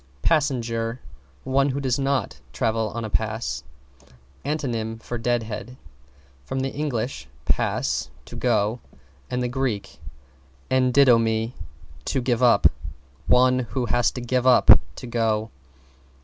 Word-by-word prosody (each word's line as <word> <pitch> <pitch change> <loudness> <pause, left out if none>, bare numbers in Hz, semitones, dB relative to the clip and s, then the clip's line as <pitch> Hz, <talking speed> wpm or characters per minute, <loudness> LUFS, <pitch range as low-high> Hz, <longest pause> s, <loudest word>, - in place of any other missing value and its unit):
=PASSENGER= 120 -6 0 0.4
One 135 +1 +2
who 135 +1 -2
does 130 -2 0
not 135 -5 -1
travel 110 - 0
on 115 +2 -5
a - - -5
pass. 110 - -2 0.8
(Antonym 120 -7 -2
for 120 +1 -5
Deadhead). 120 0 -2 0.7
From 130 - -3
Eng. 145 +2 -2 0.5
pass, - - 0 0.2
to - - -11
go, 115 -1 +1 0.5
and 125 0 -1
Grk. 125 -7 -2 0.7
endidomi, 120 -3 +3 0.5
to 135 - 0
give 120 -1 0
up. 125 -2 +4 0.6
One 125 0 +4
who 125 +1 -2
has 120 +2 +2
to 125 - -5
give 125 +1 0
up 130 - +8 0.2
to - - -8
go. 115 -2 0
120 Hz, 115 wpm, -24 LUFS, 115-130 Hz, 0.8 s, up